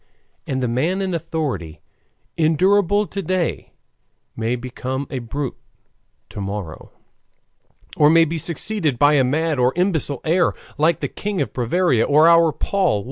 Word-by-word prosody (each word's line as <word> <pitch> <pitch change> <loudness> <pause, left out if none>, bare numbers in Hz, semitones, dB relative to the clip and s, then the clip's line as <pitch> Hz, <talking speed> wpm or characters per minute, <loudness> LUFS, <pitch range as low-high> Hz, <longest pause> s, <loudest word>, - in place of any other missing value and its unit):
And 130 -1 -2
the - - +1
man 155 +11 0
in 190 -2 -2
authority, 150 - -4 0.6
endurable 190 +5 +2
to 200 0 -5
day, 185 -1 -2 0.6
may 115 +2 -1
become 130 +2 -5
a 130 - -3
brute 130 +3 -5 0.7
to 105 - -6
morrow, 100 -4 -6 1.1
or 150 - +5
may 165 +1 +5
be 165 +1 -3
succeeded 165 - -1
by 145 +4 +4
a 140 -3 +4
mad 155 +3 0
or 125 +1 +3
imbecile 165 -7 -1
heir, 170 +3 +2 0.3
like 160 +2 +2
the - - -1
King 205 -2 -4
of 140 - -2
Bavaria 125 0 +1
or 155 +3 +4
our 165 -1 +5
Paul 185 - 0
I. - - -3
155 Hz, 150 wpm, -20 LUFS, 125-175 Hz, 1.1 s, or